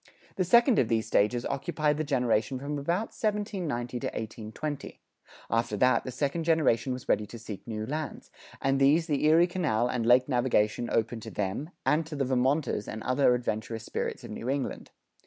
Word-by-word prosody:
The 185 - +1
second 235 +6 +5
of 120 - +3
these 110 -1 +1
stages 115 +3 +1
occupied 150 +1 0
the 155 - 0
generation 125 -4 +1
from 145 +2 -4
about 175 +9 -1
1790 185 - -2
to - - -3
1820; 115 +7 -6 0.5
after 115 -1 0
that 125 +4 +3
the 130 - -4
second 145 +6 -1
generation 150 -7 +2
was 125 -1 -5
ready 105 0 +1
to 115 - -9
seek 110 -2 -9
new 110 -1 -3
lands; 150 +4 -5 0.3
and 135 0 +1
these 145 +5 +4
the 150 -4 -1
Erie 165 +3 +6
Canal 160 -11 0
and 125 -2 -1
lake 125 +2 +5
navigation 120 -3 +1
opened 115 0 0
to - - -7
them, 105 - -3 0.2
and 150 +5 +3
to 160 - -6
the 140 -1 0
Vermonters 130 -2 +1
and 110 - -6
other 130 -1 +3
adventurous 115 -1 -3
spirits - - -3
of - - -8
New 120 - -5
England. 135 -1 -3
130 Hz, 180 wpm, -28 LUFS, 115-155 Hz, 0.5 s, Erie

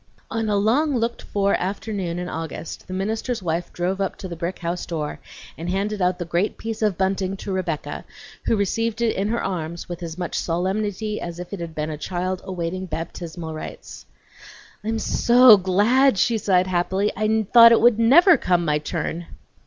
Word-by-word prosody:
On 225 -1 -1
a 205 - +2
long 250 +8 +2
looked 235 0 -2
for 200 -1 0
afternoon 190 -2 -2
in 180 0 -4
August 160 -1 -6
the - - -9
minister's 220 +3 -2
wife 170 0 -2
drove 185 +3 -2
up 195 - -1
to 190 - -7
the 170 - -6
brick 170 +2 -4
house 175 +1 -3
door, 155 -3 -4 0.4
and 170 +2 -4
handed 200 +2 -1
out 180 0 +2
the 175 - -4
great 175 +5 -1
piece 225 -1 -5
of 210 -5 +1
bunting 190 0 -1
to 195 - -6
Rebecca, 180 -5 -3 0.4
who - - +3
received 225 +3 -1
it 230 - +1
in 195 +1 -1
her 235 +2 -1
arms 170 -3 -4
with 175 0 -7
as 165 -1 -6
much 175 -2 -3
solemnity 205 +4 -2
as 170 -1 -6
if 180 +2 -8
it 200 - -4
had 165 -2 -6
been 155 +1 -2
a 150 - -6
child 185 +2 -3
awaiting 185 0 -4
baptismal 165 0 -6
rites. 155 - -9 0.8
"I'm 225 +1 -1
so 240 +1 +6
glad!" 210 +7 +3
she 225 +3 +2
sighed 185 -3 +2
happily. 185 +3 0
"I 215 +1 +1
thought 230 -1 +10
it 230 - +6
would 235 -1 +4
never 325 - +7
come 175 -2 +1
my 150 -1 +1
turn!" 165 +2 -4
190 Hz, 190 wpm, -23 LUFS, 175-215 Hz, 0.8 s, thought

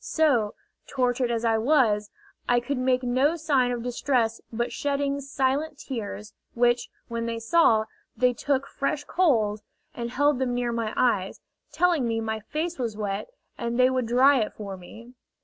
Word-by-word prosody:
So, 255 -10 +2 0.3
tortured 250 -2 0
as 235 0 -1
I 225 -1 +3
was, 220 -6 +2 0.4
I 245 0 +4
could 250 +2 -3
make 255 0 +1
no 260 +6 +2
sign 285 -6 +1
of 240 -1 -3
distress 245 -2 0
but 235 +1 -2
shedding 280 0 -1
silent 275 +2 -1
tears, 215 -6 -6 0.2
which, 240 0 +2 0.2
when 230 0 -3
they 230 0 -2
saw, 230 -2 +3 0.3
they 250 +2 +3
took 275 +3 -1
fresh 275 +1 -2
coals, 225 - +1 0.3
and 235 -1 -4
held 285 +2 +2
them 250 -2 0
near 245 -1 -1
my 230 -2 -2
eyes, 195 -6 +1 0.3
telling 320 -4 +2
me 225 -1 0
my 220 -1 -2
face 310 +9 -4
was 230 -4 -3
wet, 205 - -3 0.3
and 235 0 -2
they 255 +1 +5
would 255 -2 -1
dry 260 +3 +5
it 215 - -2
for 200 -2 -6
me. 225 +7 -13
245 Hz, 165 wpm, -26 LUFS, 230-275 Hz, 0.4 s, they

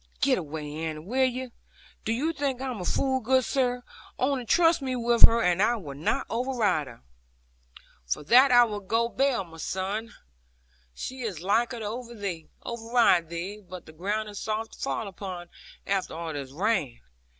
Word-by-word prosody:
'Get 265 -5 +3
away, 150 -2 -6
Annie, 160 -1 -3
will 250 +12 +1
you? 255 0 -5 0.5
Do - - 0
you 295 +8 0
think 275 -4 -1
I'm 255 -6 -4
a - - -4
fool, 265 +7 +1
good 260 +1 +2
sir! 250 -1 0 0.3
Only 260 -1 0
trust 335 -2 +4
me 260 -1 -2
with 235 -1 +7
her, 230 0 +1
and 180 +1 +2
I 235 +3 +4
will 160 -11 -7
not 145 +4 -1
override 230 - 0
her.' 115 -2 -13 1.0
'For 60 - -1
that 255 - +6
I 245 0 +8
will 210 -3 -2
go 225 +4 0
bail, 265 -4 +1
my 165 -2 -14
son. 200 +7 -3 0.8
She 260 0 -6
is 195 -9 -4
liker 235 +5 +1
to 220 - -5
override 225 -2 0
thee. 185 +5 -5
But 185 -2 -10
the 155 - -13
ground 205 +6 -2
is 205 - -7
soft 220 +1 -3
to - - -14
fall 225 - -2
upon, 185 -2 -7 0.4
after 195 -4 -1
all 165 -1 -4
this 140 -2 -5
rain. 165 - 0
220 Hz, 175 wpm, -27 LUFS, 175-250 Hz, 1.0 s, I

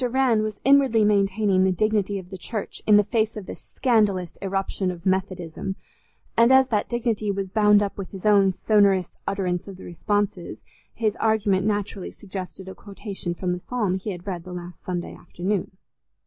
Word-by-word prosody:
Rann 250 -2 +2
was 215 -1 -4
inwardly 270 -5 +5
maintaining 200 -1 +2
the 190 - +3
dignity 205 +1 0
of 185 -1 -9
the 190 - -6
Church 215 +3 -5
in 210 -1 +7
the 205 - +5
face 220 +1 0
of 205 - -6
this - - -9
scandalous 210 -8 +1
irruption 195 -1 -2
of 175 -1 -7
Methodism, 190 -1 -2 0.6
and 235 +2 +5
as 265 0 +6
that 210 -4 0
dignity 230 -3 -1
was 195 -1 -2
bound 210 0 +5
up 200 0 -4
with 195 - -5
his 195 0 -9
own 200 -2 +5
sonorous 195 -2 +2 0.2
utterance 185 -3 -1
of 195 -2 -9
the - - -12
responses, 205 0 -2 0.4
his 220 -2 0
argument 210 -3 +1
naturally 205 -2 -2
suggested 190 -1 -8
a 190 - -7
quotation 195 -4 -6
from 180 0 -2
the 180 - -2
psalm 215 -2 -1
he 190 +3 -3
had 175 -3 -6
read 180 -4 -4
the 180 0 -9
last 175 -1 -9
Sunday 175 -1 -4
afternoon. 185 +3 -3
200 Hz, 180 wpm, -24 LUFS, 185-215 Hz, 0.6 s, in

